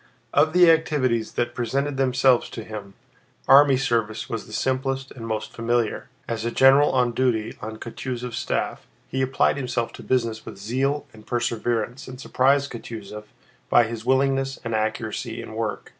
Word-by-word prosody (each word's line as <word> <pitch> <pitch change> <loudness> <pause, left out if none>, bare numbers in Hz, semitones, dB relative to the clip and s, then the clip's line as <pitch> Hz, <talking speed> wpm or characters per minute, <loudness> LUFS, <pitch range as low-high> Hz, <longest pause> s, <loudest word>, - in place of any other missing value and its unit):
Of 155 - +4
the 175 -2 +7
activities 130 -8 +1
that 120 0 -1
presented 135 +4 -1
themselves 130 -1 +3
to 115 - -7
him, 105 -2 -8 0.5
army 135 0 +7
service 115 -4 -1
was 115 - -5
the - - -13
simplest 135 +3 -1
and 115 -3 -8
most 110 -1 -3
familiar. 115 -1 -1 0.2
As 115 -1 -3
a 115 - 0
general 135 +4 +5
on 125 -2 +2
duty 115 -3 0
on 110 +1 -6
Kutúzov's 125 +1 -5
staff, - - -2 0.2
he 130 - -1
applied 130 +2 +2
himself 125 -3 -2
to - - -10
business 115 -4 -1
with - - -9
zeal 135 +8 -1
and 110 0 -16
perseverance 120 +1 -2
and 130 0 -9
surprised 140 +1 +2
Kutúzov 105 -3 -8 0.4
by 120 - +6
his 115 -1 -5
willingness 135 +1 +1
and 115 -1 -3
accuracy 110 0 -2
in - - -8
work. 110 -2 -3
120 Hz, 160 wpm, -24 LUFS, 115-135 Hz, 0.5 s, the